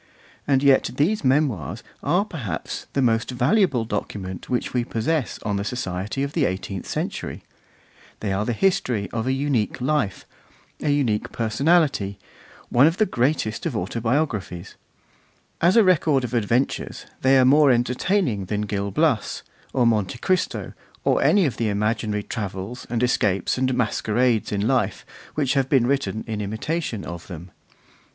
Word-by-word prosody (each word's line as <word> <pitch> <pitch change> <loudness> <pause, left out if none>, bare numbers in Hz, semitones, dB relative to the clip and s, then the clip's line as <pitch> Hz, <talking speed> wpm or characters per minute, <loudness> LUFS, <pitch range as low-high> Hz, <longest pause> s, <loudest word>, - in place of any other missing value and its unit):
And 135 -1 +3
yet 140 -2 +4
these 175 +10 +1
Memoirs 130 - +1 0.2
are 180 +8 +2
perhaps 115 - -5
the 135 - +1
most 115 -2 +1
valuable 130 - +2
document 95 -4 -5
which 125 - -1
we 125 -1 +1
possess 120 +5 -1
on 105 -2 -1
the 100 - -2
society 105 +2 -3
of 140 +1 -3
the - - +2
eighteenth 95 0 -4
century; - - -4 0.8
they 100 -3 -2
are 100 +2 0
the 120 - -1
history 120 - 0
of 115 +1 -2
a - - +2
unique 135 -5 0
life, 130 -6 -1 0.6
a 150 - 0
unique 130 -8 +1
personality, 115 - +1 0.5
one 130 +5 +6
of 165 +3 0
the 215 - +4
greatest 130 - 0
of 130 -9 -3
autobiographies; 115 - -2 0.9
as 175 +6 +4
a 225 - +8
record 155 -7 +3
of 125 - -4
adventures, 120 +3 0 0.2
they 135 +1 +5
are 130 - +5
more 145 +2 +6
entertaining 125 - +1
than 105 +2 -2
Gil 100 -1 -2
Blas, 125 - 0 0.3
or 125 -2 +2
Monte 110 -2 +1
Cristo, 185 +9 -1 0.3
or - - +2
any 200 -3 +4
of 135 - -2
the 115 -2 0
imaginary 105 0 -1
travels, 100 +2 -5
and 120 0 0
escapes, 100 -6 +1
and 130 0 +1
masquerades 115 0 +1
in 100 +1 0
life, 130 -3 0 0.3
which 140 -4 +1
have 135 -2 +1
been 130 -5 +4
written 135 -4 -1
in 110 -2 -3
imitation 110 - -3
of 85 0 -7
them. 90 0 -9
120 Hz, 155 wpm, -23 LUFS, 105-140 Hz, 0.9 s, a